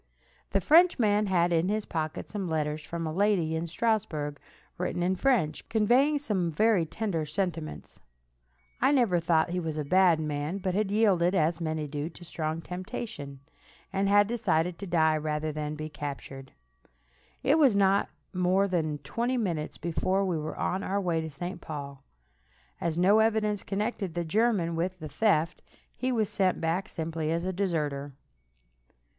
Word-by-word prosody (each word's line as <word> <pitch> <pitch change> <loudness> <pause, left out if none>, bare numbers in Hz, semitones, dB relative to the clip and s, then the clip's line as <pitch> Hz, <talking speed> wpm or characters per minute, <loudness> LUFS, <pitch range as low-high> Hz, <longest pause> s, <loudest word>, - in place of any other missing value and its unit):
The 195 - +1
Frenchman 230 - +4
had 175 -2 +2
in 165 +3 +2
his 215 0 -1
pocket 155 -2 -3
some 200 -3 -4
letters 155 -1 -1
from 165 +2 -4
a 155 - -3
lady 185 -4 +2
in 165 +1 -2
Strasburg, 170 -7 -1 0.4
written 175 -1 -1
in 185 +2 +1
French, 200 - +1
conveying 250 +7 +3
some 205 -12 -1
very 195 0 +2
tender 195 -5 -2
sentiments. 165 -1 -4 0.8
I - - +4
never 230 -10 +3
thought 165 0 +2
he 180 - -1
was 160 -3 -3
a 150 - -1
bad 180 0 +4
man, 150 +3 -2
but 185 -2 -2
had 205 +1 0
yielded, 195 -4 +3
as 165 0 +1
many 155 -2 -2
do, 145 +2 -4
to 175 - -15
a - - -11
strong 160 -1 -3
temptation, 180 - -6 0.5
and 195 0 +1
had 205 0 +6
decided 180 -7 0
to 200 - -6
die 160 -3 +3
rather 155 0 -2
than 150 0 -4
be 155 0 -5
captured. 140 -3 -7 0.9
It 290 +4 +4
was 270 -8 +5
not 200 0 +3 0.2
more 185 +2 +2
than 160 -5 -1
twenty 245 +2 -1
minutes 170 -9 -2
before 185 +3 0
we 175 -4 -1
were 155 +1 -5
on 185 - -1
our 200 0 -1
way 170 -4 0
to 160 - -5
St. 175 +4 -6
Paul. 140 -3 -7 0.8
As 165 -1 -2
no 195 +5 +5
evidence 215 -2 +2
connected 200 -3 -3
the 175 -1 -1
German 195 -2 +1
with 180 +3 -2
the 155 -3 -7
theft, 165 0 +1 0.3
he 255 0 -1
was 220 -4 +1
sent 190 -3 +1
back 170 +6 -1
simply 160 -1 -3
as 170 +2 -1
a 185 - -1
deserter. 150 -7 -2
175 Hz, 165 wpm, -28 LUFS, 155-205 Hz, 0.9 s, had